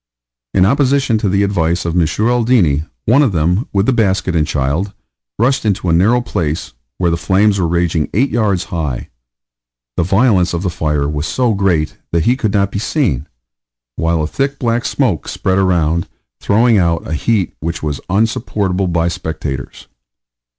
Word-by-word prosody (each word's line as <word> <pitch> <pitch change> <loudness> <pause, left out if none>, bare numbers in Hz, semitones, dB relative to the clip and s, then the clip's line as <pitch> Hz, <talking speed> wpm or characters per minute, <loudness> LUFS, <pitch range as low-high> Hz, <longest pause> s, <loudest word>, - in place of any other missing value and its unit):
In 95 - +5
opposition 135 -1 +2
to 105 - 0
the 100 +1 +2
advice 85 -4 0
of 85 - -1
M. 85 -3 +3 0.2
Aldini, 115 - +2 0.2
one 125 +6 +4
of 130 -9 +2
them, 90 - +1
with 100 0 +1
the 130 - +2
basket 95 -5 +1
and 75 -2 +1
child, 75 +9 -1 0.4
rushed 130 +5 +1
into 100 -4 0
a - - +3
narrow 110 +9 +3
place, 80 - -3 0.2
where 85 -2 +1
the 85 - 0
flames 100 +3 +2
were 85 - +1
raging 85 -2 0
8 130 +7 +1
yards 100 -6 +1
high. 75 -7 -3 0.9
The - - +2
violence 95 -1 +2
of 85 - -3
the 90 - -1
fire 75 -4 -1
was 75 +1 -3
so 125 -3 +1
great 90 -6 0
that 85 -2 +1
he 125 - +3
could 115 -6 -1
not 100 -1 +1
be 100 - -3
seen, 100 - -1 0.7
while 80 -1 0
a - - 0
thick 135 - -2
black 115 -1 -1
smoke - - 0
spread 95 +1 0
around, 85 -3 +1 0.3
throwing 110 +1 +3
out 85 -2 0
a - - -3
heat 95 +3 0
which 85 +1 -4
was 75 -3 -3
unsupportable 100 -2 0
by 85 -1 +1
spectators. 80 -5 -5
95 Hz, 170 wpm, -16 LUFS, 80-110 Hz, 0.9 s, In